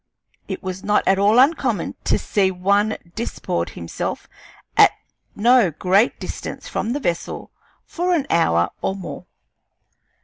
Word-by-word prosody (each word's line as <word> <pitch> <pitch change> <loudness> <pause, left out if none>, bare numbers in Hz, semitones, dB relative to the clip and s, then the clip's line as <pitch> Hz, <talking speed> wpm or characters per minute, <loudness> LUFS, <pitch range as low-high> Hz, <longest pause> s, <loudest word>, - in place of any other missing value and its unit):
It - - -5
was 185 0 -5
not 210 0 +2
at 195 0 +4
all 205 +3 +4
uncommon 255 - +2
to - - +3
see 195 -2 +1
one 200 +4 +1 0.2
disport 85 - -3
himself 85 -1 -5 0.5
at - - +7 0.4
no 235 -1 +4
great 185 - +2
distance - - -7
from 230 - -2
the 285 - -2
vessel 175 -11 -3 0.3
for 360 +1 0
an 295 -5 0
hour 85 - +2
or 190 - -1
more. 190 -3 -8
200 Hz, 135 wpm, -21 LUFS, 180-235 Hz, 0.5 s, at